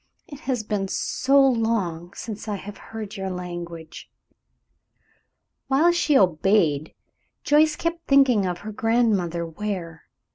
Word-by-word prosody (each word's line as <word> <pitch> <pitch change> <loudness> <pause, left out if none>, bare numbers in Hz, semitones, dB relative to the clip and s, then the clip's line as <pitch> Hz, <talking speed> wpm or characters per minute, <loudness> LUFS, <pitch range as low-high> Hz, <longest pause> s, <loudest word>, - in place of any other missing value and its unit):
"It 285 - -10
has 245 -4 0
been 205 -2 -2
so 275 +7 +1
long 220 -10 +1
since 220 -1 -7
I 210 - -2
have 200 +1 -8
heard 220 -2 -7
your 190 0 -3
language." 175 -3 -7 1.6
While 300 +6 +4
she 315 -5 +3
obeyed 165 - +2 0.5
Joyce 300 +1 +4
kept 335 0 -3
thinking 260 -8 +4
of 180 -1 -2
her 215 - -4
Grandmother 210 -7 +1
Ware. 165 -2 -5
210 Hz, 120 wpm, -24 LUFS, 175-255 Hz, 1.6 s, While